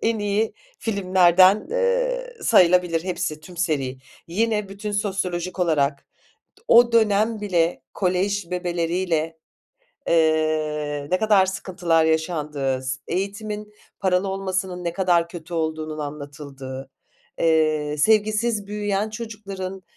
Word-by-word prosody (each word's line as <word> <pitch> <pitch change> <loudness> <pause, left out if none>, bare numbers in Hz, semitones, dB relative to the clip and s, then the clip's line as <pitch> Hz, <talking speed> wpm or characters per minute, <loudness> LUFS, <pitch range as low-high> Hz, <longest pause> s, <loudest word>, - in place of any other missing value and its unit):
en 225 -1 +1
iyi 205 +2 0 0.3
filmlerden, 190 -1 +4
eee, - - 0
sayılabilir 180 - +4
hepsi, 175 -4 -3
tüm 175 +3 -13
seri. 140 -7 -1 0.3
Yine 210 +2 0
bütün 205 +1 -6
sosyolojik 185 -3 -2
olarak 145 -5 +1 0.6
o 240 0 +6
dönem 220 0 +3
bile 175 -4 0
kolej 190 0 0
bebeleriyle, 170 -2 -1 0.7
eee, 155 -2 +1
ne 185 - +2
kadar 210 -3 +4
sıkıntılar 180 -4 0
yaşandığı, 150 -5 -1
s 130 +1 -2
eğitimin 210 +3 -4 0.3
paralı 185 0 +1
olmasının 190 -2 -3
ne 170 -1 -2
kadar 175 -3 +2
kötü 170 -1 -9
olduğunun 155 -1 -2
anlatıldığı, 140 -2 -7 0.5
eee, 155 -2 +2
sevgisiz 215 +3 +2
büyüyen 205 0 -1
çocukların 200 -4 -7
180 Hz, 105 wpm, -23 LUFS, 160-205 Hz, 0.7 s, o